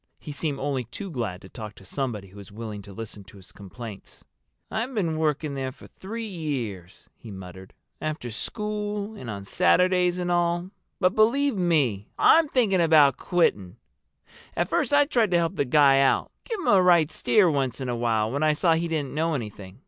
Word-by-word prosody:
He 150 - -9
seemed 145 -1 -2
only 135 -3 -2
too 185 - -8
glad 110 - -4
to - - -11
talk 105 -1 -8
to 95 - -16
somebody 105 -4 -4
who 95 - -16
was 100 -1 -11
willing 105 -1 -7
to 100 +1 -12
listen 105 0 -8
to 100 0 -15
his 95 - -13
complaints. 100 +1 -10 0.5
"I've 240 +4 -3
been 170 -7 0
working 150 -1 0
there 135 -1 -3
for - - -16
three 225 +4 -7
years," 125 - -5
he 115 - -13
muttered, 95 -1 -10 0.3
"after 155 -6 -4
school 210 - -4
and 130 - -8
on 100 -2 -6
Saturdays 180 - +3
and 175 -1 -2
all. 175 +1 0 0.3
But 185 0 +3
believe 250 +5 +3
me, 145 - +1
I'm 325 -2 +5
thinking 210 -9 +2
about 150 -5 +5
quitting. 105 - 0 0.8
At - - 0
first - - 0
I 290 0 +5
tried 235 -7 +1
to 175 - +3
help 170 +2 0
the 145 - 0
guy 135 0 +5
out—give 390 - 0
him - - -6
a 195 -2 +6
right 175 -4 +4
steer 210 -4 +3
once 135 -3 -1
in 130 - -4
a 120 - -1
while 115 -2 0
when 140 +3 -2
I 155 0 +3
saw 165 +2 +3
he 165 +1 0
didn't 155 -5 -3
know 160 +1 0
anything. 105 -5 -7
150 Hz, 195 wpm, -25 LUFS, 110-180 Hz, 0.8 s, a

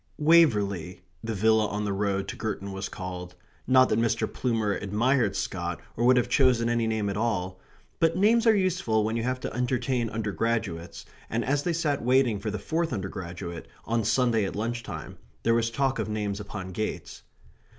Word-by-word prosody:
"Waverley," 105 - +3 0.2
the 110 -1 -3
villa 110 +1 +3
on 105 +1 -3
the 100 - -1
road 100 -1 -1
to - - -4
Girton 100 -2 -4
was 95 0 -4
called, 90 -2 -7 0.3
not 130 0 +6
that - - +2
Mr. 115 0 +1
Plumer 110 -5 -1
admired 115 +6 +1
Scott - - -3 0.2
or 115 - -1
would 125 +1 +6
have 125 - +2
chosen 125 -3 +3
any 120 -1 +1
name 110 -2 -1
at 100 0 -2
all, 95 -5 -1 0.4
but 165 +1 +2
names 225 +4 +4
are 220 - +6
useful 180 - +1
when 110 +1 -1
you 115 - 0
have 125 +2 -1
to - - -4
entertain 125 -1 0
undergraduates, 110 -5 -2 0.2
and 115 +1 -1
as 140 +2 +1
they 175 +3 -1
sat 155 -4 0
waiting 125 -4 +3
for 105 +2 -3
the 105 - -3
fourth 160 - -1
undergraduate, 90 -5 -5 0.2
on 115 0 0
Sunday 115 0 +2
at 95 - -3
lunch 115 +3 -2
time, - - -8 0.2
there 115 - +3
was 115 0 +2
talk 135 +2 0
of - - -2
names 105 -1 -2
upon 100 -2 -6
gates. 110 +4 -4
115 Hz, 185 wpm, -27 LUFS, 100-125 Hz, 0.4 s, not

